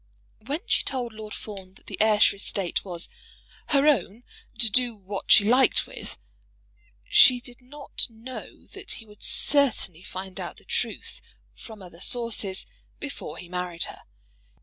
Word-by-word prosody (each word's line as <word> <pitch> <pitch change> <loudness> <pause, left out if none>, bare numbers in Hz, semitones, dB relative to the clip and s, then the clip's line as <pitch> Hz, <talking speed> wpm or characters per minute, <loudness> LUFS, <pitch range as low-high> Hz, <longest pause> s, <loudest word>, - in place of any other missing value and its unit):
When 295 +5 -2
she 455 - +1
told 250 -4 -3
Lord 215 -1 -9
Fawn 190 -3 -9
that - - -19
the - - -7
Ayrshire 210 -2 +5
estate 195 -2 -1
was 175 -3 -2 0.6
"her 280 -1 +3
own, 235 - +2 0.3
to 235 -1 +5
do 240 +1 +2
what 200 -1 -4
she 205 - +9
liked 250 +5 +4
with," - - -8 0.9
she 255 -2 +7
did 245 +1 -10
not 280 +3 -4
know 230 +3 -10
that 395 0 -6
he 225 - -9
would 210 -1 -18
certainly 255 - +2
find 185 0 -7
out - - -6
the - - -17
truth - - -3 0.3
from 215 -4 -12
other 175 -1 -13
sources 220 -6 +1 0.3
before - - -6
he 180 - -9
married 180 -1 -3
her. - - -6
220 Hz, 150 wpm, -26 LUFS, 190-250 Hz, 0.9 s, she